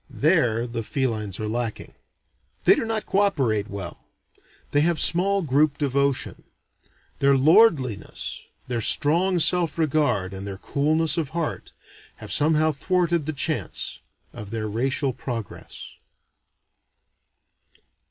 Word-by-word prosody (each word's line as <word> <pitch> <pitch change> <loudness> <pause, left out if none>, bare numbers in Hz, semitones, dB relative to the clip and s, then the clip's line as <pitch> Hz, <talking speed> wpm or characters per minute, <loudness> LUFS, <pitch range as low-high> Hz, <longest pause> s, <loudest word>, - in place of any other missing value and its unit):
There 115 0 +1
the 115 -1 -5
felines 110 -6 -3
are 110 - -3
lacking. 115 0 -4 0.7
They - - +6
do - - -2
not 225 -1 -3
co 195 - 0
operate 130 - +1
well; 100 -1 -7 0.6
they 145 - +3
have 165 +1 +1
small 195 +3 +3
group 145 0 +1
devotion. 140 -1 -1 0.7
Their 140 0 +4
lordliness, 145 - +2 0.2
their 120 -2 -2
strong 170 - +4
self 170 -1 +2
regard, 130 - 0
and 95 +1 -7
their 95 -1 -6
coolness 155 - 0
of 155 -4 -3
heart, 165 -2 -4 0.4
have - - -9
somehow 155 +1 +3
thwarted 170 0 -1
the - - 0
chance 155 +2 -2 0.3
of 105 - -9
their 110 0 -3
racial 130 +5 -1
progress. 120 -3 -7
140 Hz, 120 wpm, -23 LUFS, 115-160 Hz, 0.7 s, They